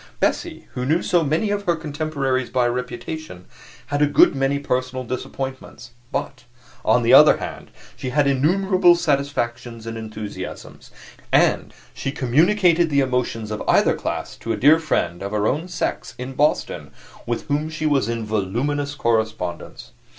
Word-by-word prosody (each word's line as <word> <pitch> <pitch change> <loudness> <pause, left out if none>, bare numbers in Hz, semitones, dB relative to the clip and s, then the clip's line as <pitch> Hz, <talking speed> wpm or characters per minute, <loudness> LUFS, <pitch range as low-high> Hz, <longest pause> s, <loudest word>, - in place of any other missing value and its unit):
Bessie, - - -1
who 125 - -3
knew 155 +7 +1
so 175 -4 +2
many 160 +8 0
of 205 0 -2
her 170 - +2
contemporaries 145 -5 -2
by 125 -1 +1
reputation, 125 - -5 0.4
had 145 0 -2
a 150 - +5
good 145 - +5
many 135 +1 0
personal 130 -2 -2
disappointments; 130 -1 -6 0.2
but, - - -4 0.4
on - - +3
the - - +4
other - - +8
hand, - - -7 0.3
she 130 - -5
had 145 +2 +2
innumerable 175 +6 +3
satisfactions 125 -7 -2
and 115 0 -5
enthusiasms, 105 -3 -8 0.4
and - - +3 0.2
she 135 - -4
communicated 170 - +3
the 140 -2 +2
emotions 125 -4 -2
of 105 - -4
either - - +4
class - - -4
to 115 - -5
a 110 - -1
dear 150 +5 +6
friend, 90 - -1
of 100 +1 -5
her 105 -1 0
own 150 +9 0
sex, 175 -1 -3
in 125 +2 -6
Boston, 145 +3 0 0.4
with 120 -1 -2
whom 150 +1 -1
she 155 0 -4
was 140 -5 +2
in 115 -1 -3
voluminous 125 +8 -2
correspondence. 110 -8 -2
135 Hz, 155 wpm, -22 LUFS, 120-155 Hz, 0.4 s, other